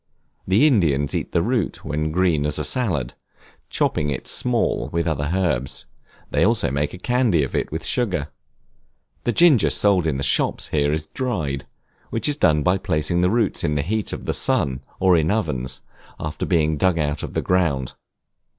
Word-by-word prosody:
The 100 +10 +4
Indians 80 - +2
eat - - -3
the 85 - +1
root 115 -4 -2
when 75 +2 -2
green 80 -4 +1
as 75 - -2
a 75 - -1
salad, 85 - -1 0.6
chopping 75 -1 0
it 70 - -4
small 125 -2 +1
with 85 -1 -1
other 75 -3 -1
herbs; 85 -9 -1 0.5
they - - +2
also - - +2
make 70 +4 -1
a - - -9
candy 115 - +1
of 65 - -4
it - - -1
with - - -4
sugar. 90 - 0 1.0
The 120 - +2
ginger 145 - +5
sold 95 -5 +3
in 75 -4 0
the 70 - -3
shops 65 - 0
here 75 -1 +1
is 75 0 -2
dried, 80 - -3 0.4
which 115 - -1
is 145 - +2
done 75 - +2
by 90 +4 +2
placing 85 -2 0
the 90 - +3
roots 110 -2 0
in 75 - 0
the 70 - 0
heat 110 +6 -2
of - - -6
the - - -1
sun 65 -2 +1 0.2
or 95 -1 +4
in 80 -1 +2
ovens, 75 - -2 0.4
after 75 -1 -4
being 80 -2 +1
dug 90 +1 +2
out 75 -2 -1
of - - -7
the - - +1
ground. 80 -8 0
85 Hz, 185 wpm, -22 LUFS, 75-100 Hz, 1.0 s, ginger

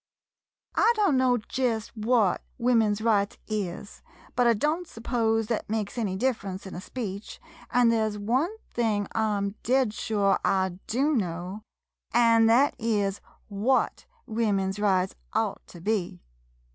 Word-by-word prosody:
I 470 - +4
don't 400 -9 +3
know 255 -1 +3
jest 230 -1 -2
what 220 -3 +2 0.2
Women's 225 -4 +2
Rights 215 0 +1
is, 205 -2 -4 0.3
but 245 -1 +3
I 235 - +5
don't 310 +9 -1
s'pose 225 -2 0
thet 220 -1 -3
makes 215 -2 -2
any 210 -6 -1
differ 230 -1 -1
ence 190 +1 -6
in 190 - -8
a 175 - -6
speech, 205 -2 -6 0.3
an' 245 -1 +4
there 220 -1 +2
's 210 - -6
one 245 - +1 0.2
thing 215 -4 0
I 220 -2 +1
'm 200 0 -2
dead 255 -2 +2
sure 205 -4 +1
I 190 -2 +1
do 275 +7 +1
know, 180 -1 -3 0.5
an' 230 -1 +5
thet 250 +6 +4
is 205 -4 0 0.3
what 220 +6 0 0.2
Wo 225 -2 0
men's 195 0 -1
Rights 190 -2 +2 0.2
ought 220 -2 -1
to 175 - -12
be. 180 - -1
220 Hz, 150 wpm, -27 LUFS, 200-240 Hz, 0.5 s, I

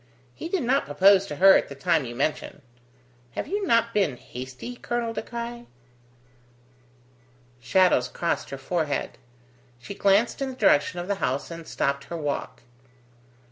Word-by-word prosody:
He 330 - -7
did 360 -5 0
not 265 +4 +1
propose 195 +6 +5
to 150 - -5
her 190 +6 +7
at - - +1
the 140 - -8
time 160 0 +1
you 120 0 -7
mention. 145 +1 -2 0.7
Have - - -4
you 405 0 -2
not 230 0 +3
been 190 -12 +1
hasty, 130 - -8
Colonel 240 -1 -3
De - - -3
Craye?" 235 0 -7 1.9
Shadows 130 0 +3
crossed 170 +6 -2
her 135 - -6
forehead. 145 +1 -2 0.6
She 130 +12 -9
glanced 200 +6 +2
in 270 - -1
the 260 - -7
direction 180 - +3
of 175 - -5
the 200 -1 -2
house 135 +6 -1
and 165 -1 -8
stopped 140 0 -1
her 170 - -6
walk. 145 -5 -4
180 Hz, 155 wpm, -25 LUFS, 140-230 Hz, 1.9 s, her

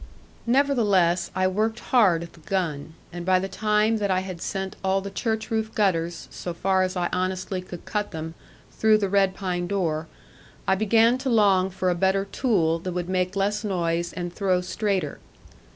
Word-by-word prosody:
Nevertheless, 210 -10 +3
I 185 0 +2
worked 215 +4 0
hard 190 -10 +3
at 170 - -11
the - - -17
gun, 160 -3 -3 0.2
and 175 0 -5
by 185 +1 +3
the 190 +1 -2
time 210 +2 +1
that 205 -2 -1
I 185 -1 +2
had 185 -3 -7
sent 190 -1 -3
all 190 0 +2
the 200 0 -6
church 220 +2 -2
roof 220 0 -1
gutters, 170 -5 0
so 175 -1 -6
far 190 +1 +1
as 185 0 -1
I 175 -1 +1
honestly 185 0 -2
could 180 -1 -10
cut 210 -1 -2
them, 160 0 -6 0.4
through 220 -1 +4
the 200 -2 -1
red 195 -1 +2
pine 180 -3 -2
door, 165 -5 -1 0.6
I - - +4
began 225 +5 +3
to 265 0 -2
long 200 -5 +4
for 185 -1 -1
a - - +2
better 190 +2 +1
tool 185 -7 +1
that 180 +1 -5
would 180 0 -3
make 185 0 0
less 205 +2 0
noise 170 -4 -1
and 175 -1 -5
throw 185 -2 +1
straighter. 195 +1 -2
190 Hz, 185 wpm, -25 LUFS, 175-210 Hz, 0.6 s, through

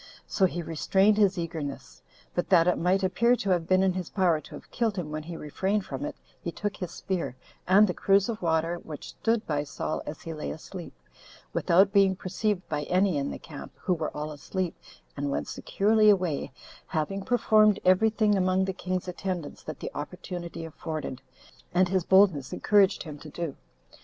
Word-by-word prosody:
So 190 - +2
he 175 -1 -4
restrained 190 +6 +2
his 200 -4 +3
eagerness; 160 -4 -5 0.3
but 175 - -1
that 175 -2 +5
it 180 - +2
might 185 +3 +2
appear 235 +6 +3
to 200 -5 -2
have 170 -2 +1
been 185 0 +4
in 190 -1 +3
his 185 -2 -4
power 175 -6 +2
to - - -11
have - - -13
killed 225 -4 0
him 160 -4 -3
when 155 0 -3
he 165 +2 -7
refrained 190 +7 -1
from 290 - -4
it, 300 -1 -5 0.3
he 170 - -3
took 205 +3 -3
his 180 - -4
spear, 170 -7 -3 0.3
and 195 +4 +7
the 180 - -1
cruse 195 +1 +3
of 225 -2 -4
water 165 0 +1
which 155 -3 -9
stood 230 -1 0
by 145 -2 -1
Saul 150 +1 -3
as 150 - -7
he 165 - -5
lay 155 - -5
asleep, 175 +2 -8 0.6
without 195 +3 +4
being 195 -2 +5
perceived 185 +1 -2
by 150 -1 -2
any 185 +1 +2
in 140 - -2
the - - -5
camp, 150 -3 -10
who 185 - 0
were 160 -3 -2
all 150 +1 -3
asleep, 175 +4 -3 0.4
and 145 0 -2
went - - -2
securely 215 +1 +3
away, 180 -11 +1 0.4
having 180 +6 -2
performed 215 -3 +4
every 185 +4 +5
thing 215 -1 +2
among 185 0 +2
the 190 - -2
king's 185 0 -3
attendants 180 -4 -4
that 155 -3 -7
the - - -4
opportunity 175 +2 -6
afforded, 155 -4 -5 0.5
and 180 0 +4
his 185 -1 +1
boldness 190 -8 +4
encouraged 200 -2 +3
him 150 -3 -8
to 155 - -10
do. 160 -1 -4
185 Hz, 190 wpm, -27 LUFS, 160-195 Hz, 0.6 s, and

